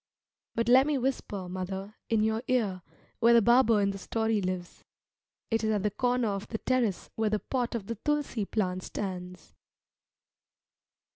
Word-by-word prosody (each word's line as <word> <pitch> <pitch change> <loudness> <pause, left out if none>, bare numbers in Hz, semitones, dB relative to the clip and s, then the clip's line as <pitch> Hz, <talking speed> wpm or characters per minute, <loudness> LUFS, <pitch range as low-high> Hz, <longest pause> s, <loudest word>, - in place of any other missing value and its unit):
But 230 0 0
let 260 +3 +6
me 300 -2 +1
whisper, 240 -7 -2
mother, 190 +2 -5 0.2
in 225 -2 +3
your 220 +1 +1
ear 210 -8 +1 0.4
where 235 +1 +6
the 235 - +7
barber 235 -1 +5
in 200 0 +2
the 195 - -7
story 220 0 0
lives. 180 -2 -4 0.7
It 225 0 +1
is 220 - +1
at 210 -2 +1
the 210 - +1
corner 245 +1 +1
of 195 0 -3
the 220 - -3
terrace 240 -6 0
where 220 -1 +1
the 215 - +1
pot 245 +2 -2
of 220 -4 -3
the 230 - -3
tulsi 295 -8 0
plant 185 -3 -1
stands. 180 -3 -6
220 Hz, 165 wpm, -29 LUFS, 195-240 Hz, 0.7 s, the